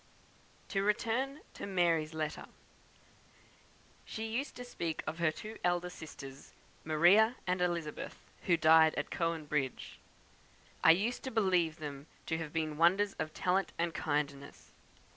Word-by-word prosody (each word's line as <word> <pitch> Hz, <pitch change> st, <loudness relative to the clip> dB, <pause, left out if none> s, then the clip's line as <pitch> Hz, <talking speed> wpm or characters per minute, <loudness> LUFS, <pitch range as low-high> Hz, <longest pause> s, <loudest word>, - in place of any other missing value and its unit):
To 195 Hz, -, 0 dB
return 230 Hz, +7 st, 0 dB
to -, -, -6 dB
"Mary's" 170 Hz, -4 st, +1 dB
letter. 155 Hz, -1 st, -3 dB, 1.6 s
"She 220 Hz, -, -5 dB
used 235 Hz, +6 st, -3 dB
to 245 Hz, -, -7 dB
speak 165 Hz, -9 st, -4 dB
of 160 Hz, +1 st, -4 dB
her 170 Hz, -1 st, +3 dB
two 215 Hz, +7 st, -9 dB
elder 175 Hz, 0 st, +1 dB
sisters, 135 Hz, -5 st, -10 dB, 0.3 s
Maria 180 Hz, +10 st, +5 dB
and 180 Hz, 0 st, 0 dB
Elizabeth, 170 Hz, -4 st, -2 dB, 0.3 s
who 175 Hz, -2 st, +4 dB
died 160 Hz, 0 st, +6 dB
at 145 Hz, -, -3 dB
Cowan 165 Hz, -2 st, -1 dB
Bridge. 140 Hz, -3 st, -3 dB, 0.8 s
I -, -, +7 dB
used 205 Hz, +9 st, +3 dB
to -, -, -2 dB
believe 185 Hz, -8 st, +2 dB
them 145 Hz, -2 st, -7 dB, 0.2 s
to 160 Hz, -, -1 dB
have 160 Hz, -2 st, -5 dB
been 155 Hz, -2 st, -2 dB
wonders 190 Hz, +4 st, +4 dB
of 155 Hz, -, -2 dB
talent 185 Hz, +1 st, +1 dB
and 170 Hz, 0 st, 0 dB
kindness. 145 Hz, -2 st, -3 dB
170 Hz, 140 wpm, -33 LUFS, 155-195 Hz, 1.6 s, I